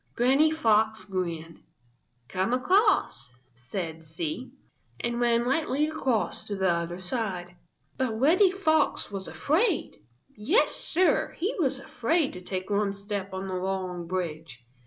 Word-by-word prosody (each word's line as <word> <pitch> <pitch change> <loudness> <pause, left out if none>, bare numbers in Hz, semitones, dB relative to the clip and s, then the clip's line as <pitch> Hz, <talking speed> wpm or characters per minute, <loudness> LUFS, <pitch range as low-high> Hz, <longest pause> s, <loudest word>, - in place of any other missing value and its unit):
Granny 270 +6 +4
Fox 220 -7 +2
grinned. 170 -4 -4 0.7
"Come 185 - -1
across," 255 - +2 0.2
said 160 +7 -6
she, 160 +10 -5 0.5
and 235 0 -2
ran 235 -1 +2
lightly 280 +2 +1
across 265 -7 -1
to 205 - -4
the 190 -2 +2
other 170 +1 -2
side. 185 -3 -3 0.4
But 230 -4 -1
Reddy 350 - +5
Fox 325 - +1
was 195 -1 -5
afraid. 340 - 0 0.4
Yes, 295 - +3
Sir, 365 +2 +1
he 385 +8 -1
was 270 -5 +1
afraid 275 +4 0
to 180 - -8
take 185 +2 -5
one 200 -1 +1
step 200 -1 -4
on 190 0 -4
the 190 - -4
long 185 -2 -3
bridge. 160 -8 -4
210 Hz, 135 wpm, -27 LUFS, 180-270 Hz, 0.7 s, Reddy